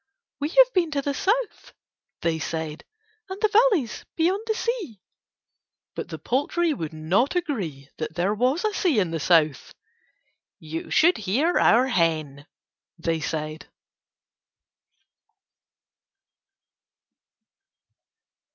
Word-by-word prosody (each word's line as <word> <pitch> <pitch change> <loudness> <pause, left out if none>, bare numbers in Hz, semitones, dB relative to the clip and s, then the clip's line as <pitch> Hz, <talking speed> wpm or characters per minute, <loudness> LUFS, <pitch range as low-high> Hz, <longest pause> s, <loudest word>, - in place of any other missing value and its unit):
"We 290 +1 -1
have - - +5
been 350 -4 +2
to 280 - 0
the 285 - -1
South," 430 - -1 0.5
they 165 -1 0
said, 160 -1 -4 0.5
"and 380 +1 -6
the 430 - +2 0.2
valleys 290 - -2
beyond 360 +5 +1
the 440 - 0
sea." 435 - -3 0.9
But - - -6
the - - -6
poultry 305 +6 0
would 160 - -5
not 175 - 0
agree 195 - -3
that 155 0 -4
there 180 +4 +1
was 255 - +1
a 425 - 0
sea 355 - +1
in 185 -5 +1
the 165 - -2
South: 155 -3 +2 0.8
"You 160 +1 -7
should 345 +3 +4
hear 255 - +1
our 240 +3 +5
hen," 155 - -1 0.5
they 165 -1 -1
said. 155 0 -4
225 Hz, 115 wpm, -24 LUFS, -, 0.9 s, have